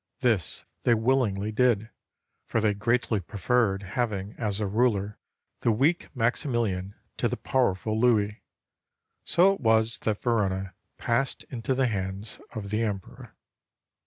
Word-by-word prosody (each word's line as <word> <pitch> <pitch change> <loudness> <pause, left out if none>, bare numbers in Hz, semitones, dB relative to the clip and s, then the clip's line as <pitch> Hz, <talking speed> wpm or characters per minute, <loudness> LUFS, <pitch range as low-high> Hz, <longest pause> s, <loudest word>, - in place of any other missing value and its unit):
This 115 -8 +1 0.2
they 120 - +4
willingly 110 -4 +1
did, 110 -2 +2 0.6
for 115 - 0
they 105 -1 +2
greatly 115 +1 +1
preferred 100 +2 0
ha\ang 105 -1 -2
as 105 -3 -2
a 105 - 0
ruler 105 -1 +1 0.4
the 115 - +2
weak 140 +10 +1
Maximilian 115 -5 0 0.2
to - - +1
the - - -3
powerful 110 -4 0
Louis. 110 -3 +2 0.8
So 180 +5 +5
it 195 - -8
was 110 0 +3
that 105 -2 -1
Verona 95 -5 0 0.2
passed 120 +3 0
into 125 +2 -1
the 135 0 +2
hands 100 -1 -3
of 100 -2 -5
the 110 +1 +1
Emperor. 100 -4 -5
110 Hz, 130 wpm, -27 LUFS, 100-120 Hz, 0.8 s, So